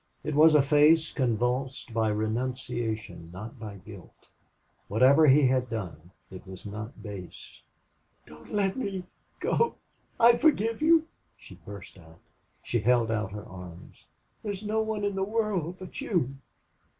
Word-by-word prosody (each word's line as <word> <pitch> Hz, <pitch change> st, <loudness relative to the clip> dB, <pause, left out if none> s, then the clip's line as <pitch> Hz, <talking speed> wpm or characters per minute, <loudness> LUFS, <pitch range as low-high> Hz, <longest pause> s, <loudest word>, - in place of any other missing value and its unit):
It 150 Hz, -, -3 dB
was 155 Hz, +2 st, +6 dB
a 145 Hz, -, +6 dB
face 150 Hz, +3 st, +4 dB
convulsed 125 Hz, 0 st, -1 dB
by 110 Hz, -1 st, +1 dB
renunciation, 110 Hz, -4 st, -3 dB
not 110 Hz, +7 st, -9 dB
by 105 Hz, -2 st, -7 dB
guilt. 100 Hz, -1 st, -14 dB, 0.6 s
Whatever 135 Hz, +9 st, +5 dB
he 140 Hz, +1 st, +6 dB
had 130 Hz, -1 st, +1 dB
done, 90 Hz, -7 st, -6 dB, 0.2 s
it 95 Hz, 0 st, -11 dB
was 95 Hz, +2 st, -10 dB
not 105 Hz, +4 st, -7 dB
base. 100 Hz, -5 st, -10 dB, 0.6 s
"DON'T 75 Hz, 0 st, -15 dB
LET 200 Hz, -2 st, +1 dB
ME 195 Hz, -8 st, -3 dB, 0.4 s
GO!... 465 Hz, -, +1 dB, 0.4 s
I 235 Hz, +1 st, +7 dB
FORGIVE 230 Hz, -7 st, +2 dB
YOU!" 320 Hz, 0 st, +4 dB, 0.3 s
she -, -, -14 dB
burst 100 Hz, -1 st, -11 dB
out. 80 Hz, -1 st, -17 dB, 0.5 s
She 120 Hz, -, -1 dB
held 115 Hz, 0 st, +2 dB
out 105 Hz, -3 st, -1 dB
her 105 Hz, 0 st, -7 dB
arms. 90 Hz, -2 st, -12 dB, 0.4 s
"THERE'S 205 Hz, -2 st, -5 dB
NO 215 Hz, +1 st, 0 dB
ONE 220 Hz, -1 st, -2 dB
IN 200 Hz, -, 0 dB
THE 190 Hz, 0 st, -1 dB
WORLD 200 Hz, -5 st, -1 dB
BUT 185 Hz, -2 st, -8 dB
YOU!" 145 Hz, -, -1 dB
125 Hz, 145 wpm, -28 LUFS, -, 0.6 s, I